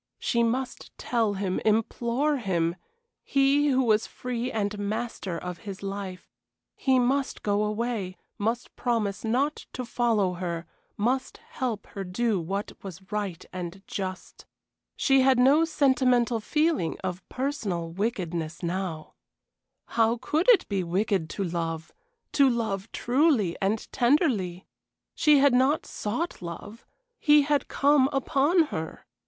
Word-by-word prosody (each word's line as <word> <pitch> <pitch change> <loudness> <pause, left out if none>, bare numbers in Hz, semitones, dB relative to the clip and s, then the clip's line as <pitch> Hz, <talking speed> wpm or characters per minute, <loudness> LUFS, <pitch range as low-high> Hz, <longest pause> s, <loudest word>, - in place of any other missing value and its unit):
She 235 - 0
must 245 +2 -1
tell 225 -4 0
him, 190 -1 -1
implore 235 +6 +1
him 175 -7 0 0.5
he 280 +1 +3
who 265 -2 +3
was 220 -2 +2
free 250 0 -4
and 210 -1 -2
master 205 -3 -3
of 180 0 -6
his 200 -2 -8
life; 195 -2 -5 0.5
he 265 -1 +2
must 265 +2 0
go 205 0 +1
away, 210 -3 -2 0.2
must 230 +4 -2
promise 225 -5 -1
not 260 +7 0
to 250 - -4
follow 225 -6 +1
her, 170 -2 -4 0.3
must 255 +5 0
help 240 -5 -3
her 195 - -6
to 180 - -9
do 220 +1 +1
what 195 +5 -3
was 190 +1 -10
right 200 -5 -3
and 185 +1 -6
just. 185 -1 -6 0.5
She 270 -1 +4
had 260 -1 +4
no 280 +6 +5
sentimental 255 -6 +2
feeling 300 - 0
of 185 -1 -3
personal 210 - -2
wickedness 175 -5 -3
now. 175 -3 -3 0.7
How 230 +1 +2
could 310 - +1
it 475 - +6
be 195 -3 -1
wicked 185 -1 0
to 200 - -3
love 165 -2 -3 0.4
to 280 -2 +5
love 220 -4 -2
truly 245 - +2
and 205 +3 0
tenderly? 240 - +1 0.5
She 300 -3 +5
had 280 -1 +5
not 260 +5 +3
sought 245 +12 -3
love; 190 +6 -8 0.3
he 295 -1 +6
had 290 0 +1
come 280 -1 +3
upon 280 +5 +3
her. 160 0 -5
225 Hz, 135 wpm, -27 LUFS, 190-260 Hz, 0.7 s, it